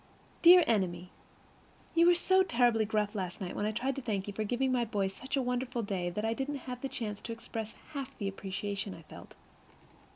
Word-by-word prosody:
Dear 350 +1 +9
Enemy: 180 - 0 0.8
You 335 +1 +5
were 350 - +7
so 375 +2 +4
terribly 240 -9 +3
gruff 210 -1 0
last 185 -3 -4
night 185 -2 -5
when 205 - 0
I - - 0
tried 250 +5 -1
to - - -3
thank 205 -6 -2
you 205 - -4
for 215 - -2
giving 250 +5 0
my 250 -2 +2
boys 200 -4 -1
such 265 +7 -4
a 270 - +1
wonderful 245 -1 -1
day 185 -4 -2
that 210 +5 -3
I 225 - +1
didn't 275 +2 -4
have 250 0 -6
a - - 0
chance 210 -5 -4
to 230 - -6
express 225 -1 -6 0.2
half 275 -2 -4
of - - -26
the 200 - -2
appreciation 195 0 -4
I 165 - -13
felt. - - -13
225 Hz, 220 wpm, -31 LUFS, 200-260 Hz, 0.8 s, Dear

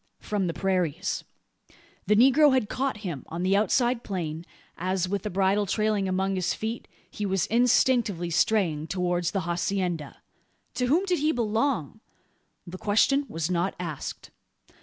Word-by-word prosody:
From 205 -4 -2
the 165 - -2
prairies. 180 -4 -1 0.8
The 210 - +4
negro 270 +4 +6
had 220 -5 0
caught 270 -2 -1
him, 160 -8 -4
on 170 +2 -4
the 190 +1 +3
outside 240 +4 +2
plain, 170 -4 -4 0.3
as, 185 +1 -1
with 200 +1 -2
the 210 - -4
bridle 195 +2 +1
trailing 215 -1 0
among 190 +1 0
his 185 -2 -1
feet, 225 +2 -4 0.2
he 210 - -5
was 195 -2 +1
instinctively 235 -6 +2
straying 165 -5 +1
towards 180 -1 0
the 195 +2 -2
hacienda. 175 -2 -2 0.6
To 250 - -1
whom 335 +9 +2
did 360 -3 0
he 305 +2 +2
belong? 225 - -1 0.7
The 185 +1 -9
question 275 +7 +2
was 165 +2 -2
not 180 +2 0
asked. 165 -5 -6
195 Hz, 150 wpm, -26 LUFS, 175-230 Hz, 0.8 s, negro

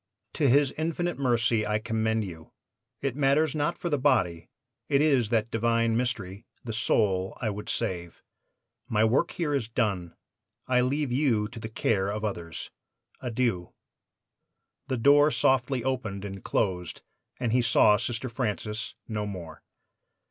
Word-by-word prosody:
To 145 -4 +2
His 140 +1 +4
infinite 165 +1 -1
mercy 120 -4 +2
I 105 0 0
commend 110 0 0
you. 80 -4 -10 0.5
It 135 -3 -1
matters 145 +2 +2
not 155 +2 -1
for - - -4
the 145 -4 0
body; 110 - +1 0.4
it 140 -2 +4
is 135 -7 +3
that 115 -1 0
divine 115 0 +1
mystery, 105 -5 -3 0.2
the 115 - -5
soul, 95 -3 +1
I 110 - -1
would 105 +1 -7
save. 85 -7 -3 0.7
My 110 -1 +2
work 125 +9 +2
here 160 -4 -2
is 135 -6 0
done. 100 -8 -1 0.5
I 125 -1 +3
leave 140 +2 0
you 120 -6 +2
to - - -9
the 110 0 -6
care 100 -3 0
of 105 +1 -3
others. 85 -6 -5 0.5
Adieu.' 115 -7 -1 1.1
"The 130 -2 -1
door 145 +5 +6
softly 130 -3 +1
opened 110 -7 -2
and 95 -1 -7
closed, 90 -4 -1 0.4
and 120 -3 0
he 125 +2 +3
saw 110 -2 +5
Sister 120 +4 -3
Francis 110 -3 -3
no 105 -2 -3
more. 85 -6 -8
115 Hz, 150 wpm, -27 LUFS, 105-130 Hz, 1.1 s, door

